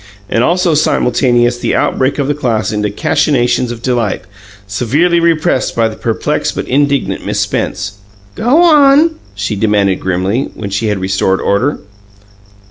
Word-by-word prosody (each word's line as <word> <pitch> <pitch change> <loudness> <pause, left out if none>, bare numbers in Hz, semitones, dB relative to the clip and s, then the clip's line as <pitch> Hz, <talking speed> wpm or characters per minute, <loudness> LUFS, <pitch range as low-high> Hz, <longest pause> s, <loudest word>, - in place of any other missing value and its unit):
And 115 - +1
also 175 +2 +2
simultaneous 120 -4 +1
the - - -1
outbreak 130 +1 0
of 140 -2 -1
the 145 - +1
class 120 -7 -1
into 105 -1 -1
cachinnations 120 +3 0
of 120 0 -8
delight, 120 -7 -1 0.4
severely 140 - +1
repressed 165 -4 +1
by 115 -1 +2
the 110 - -6
perplexed 115 0 -2
but - - -4
indignant 140 0 0
Miss - - -2
Spence. 100 +1 -3 0.3
"Go 265 - +2
on!" 300 -1 +5 0.2
she 100 +1 -3
commanded 100 -2 +1
grimly, 95 +7 -1
when 100 -2 -6
she 100 +3 -1
had 105 -2 0
restored 95 0 0
order. 120 +9 0
120 Hz, 145 wpm, -13 LUFS, 105-145 Hz, 0.4 s, on